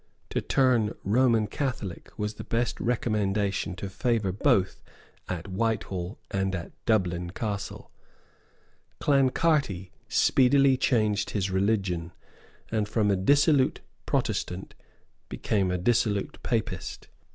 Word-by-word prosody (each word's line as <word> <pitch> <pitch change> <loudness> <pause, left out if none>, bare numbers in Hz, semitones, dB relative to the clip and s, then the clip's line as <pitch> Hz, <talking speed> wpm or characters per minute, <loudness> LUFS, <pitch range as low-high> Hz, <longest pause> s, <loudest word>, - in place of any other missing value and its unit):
To - - 0
turn 125 -5 +2
Roman 115 +1 +3
Catholic 120 - -4
was 105 0 -2
the - - -8
best 115 0 -1
recommendation 105 -6 0
to 100 - -5
favour 105 0 0
both 95 0 +1 0.5
at 90 0 -4
Whitehall 100 -2 -2
and 95 -1 0
at 85 - -6 0.2
Dublin 90 -6 +1
Castle. 100 +1 -5 1.1
Clancarty 135 - +2 0.2
speedily 135 +1 +4
changed 110 -5 +1
his 95 -2 -1
religion, 95 -4 0 0.6
and 110 -2 0
from 105 -2 +2
a - - +3
dissolute 140 - +3 0.3
Protestant 90 +2 -2 0.6
became 100 -4 0
a 90 - 0
dissolute 105 0 0
Papist. 110 -6 -3
105 Hz, 105 wpm, -27 LUFS, 95-120 Hz, 1.1 s, speedily